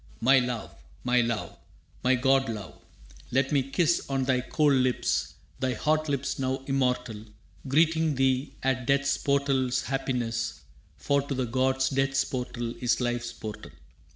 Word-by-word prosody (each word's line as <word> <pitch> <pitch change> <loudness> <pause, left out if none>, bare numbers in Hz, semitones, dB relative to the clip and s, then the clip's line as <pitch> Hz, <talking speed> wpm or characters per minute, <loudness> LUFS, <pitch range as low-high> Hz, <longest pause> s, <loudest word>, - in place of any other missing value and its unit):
«My 130 +3 +5
love, 125 -2 -3 0.3
my 125 0 +3
love! 115 -2 -3 0.4
My 130 +1 +4
god 135 +1 +2
love! 105 -6 -7 0.5
Let 135 +2 +1
me 140 -2 +3
kiss 160 +5 +1
On 135 -1 0
thy 130 -1 +1
cold 145 +3 +2
lips 130 -2 +1 0.2
thy 130 -2 0
hot 155 +5 0
lips 140 -1 -2
now 130 0 -1
immortal, 125 -5 -1 0.4
Greeting 160 +2 +3
thee 130 +1 +1
at 130 -1 0
Death's 140 0 +2
portal's 135 -3 +1
happiness, 120 -3 -2 0.4
For 140 0 +1
to 140 0 -4
the 130 -1 0
gods 130 +3 +1
Death's 135 0 +1
portal 120 -2 -4
is 120 -1 +2
Life's 120 -1 -2
portal. 110 -2 -8
130 Hz, 145 wpm, -27 LUFS, 125-135 Hz, 0.5 s, My